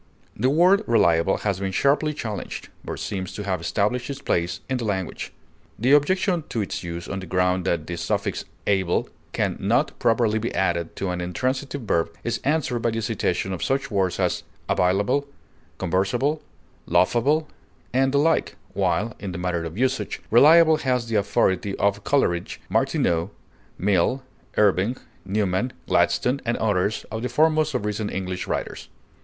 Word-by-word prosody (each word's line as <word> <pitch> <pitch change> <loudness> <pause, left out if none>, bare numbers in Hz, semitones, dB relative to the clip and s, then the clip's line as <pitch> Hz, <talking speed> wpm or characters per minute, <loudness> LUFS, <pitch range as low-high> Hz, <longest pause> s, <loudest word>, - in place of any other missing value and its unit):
The 125 +5 +1
word 180 +7 +5
reliable 95 -5 +3
has 100 -3 -1
been 95 -1 -2
sharply 145 +8 +2
challenged, 110 -7 -5
but - - -5
seems 95 -3 -4
to 105 - -5
have 95 -4 -2
established 105 +8 0
its 140 - -4
place 85 0 -1
in 130 - -1
the 120 - -4
language. 95 -5 -3 0.5
The 120 +6 +2
objection 175 +4 +3
to 115 - -1
its 95 - -5
use 85 0 -5
on 95 - -4
the 95 - -8
ground 90 +1 +1
that 85 -4 0
the 85 +1 -5
suffix - - -2
_ - - -27 0.4
able_ 85 - 0 0.2
can - - -1
not - - +1
properly 115 -1 +2
be 115 - -2
added 85 -3 0
to 95 -2 -2
an 90 0 -3
intransitive 130 +10 -2
verb 85 -7 0
is 120 - -1
answered 140 -4 0
by 115 - +1
the 115 0 -2
citation 95 -4 -1
of 90 - -4
such 135 -1 -1
words 95 -3 0
as - - +1 0.3
"available," 100 +10 +1 0.5
"conversable," 120 - 0 0.5
"laughable," 145 - +2 0.5
and 135 +1 +3
the 140 - +2
like, 160 +3 +2 0.2
while, 110 +3 0
in 100 -2 -5
the - - -4
matter 90 -2 -1
of 85 +3 -7
usage, 130 +2 0
reliable 160 +6 +7
has 125 -4 -1
the 115 - -1
authority 100 -1 +1
of 100 0 0
Coleridge, 90 -11 0
Martineau, 85 +2 +1 0.5
Mill, 100 +7 +1 0.3
Irving, 105 +4 +3 0.3
Newman, 100 +3 0 0.2
Gladstone, 130 +3 +2
and 120 -1 -1
others 105 -1 0
of 110 +1 -3
the 125 - -2
foremost 155 +2 +2
of 105 - -1
recent 105 0 -2
English 95 -1 -4
writers. - - -4
105 Hz, 165 wpm, -24 LUFS, 95-130 Hz, 0.5 s, reliable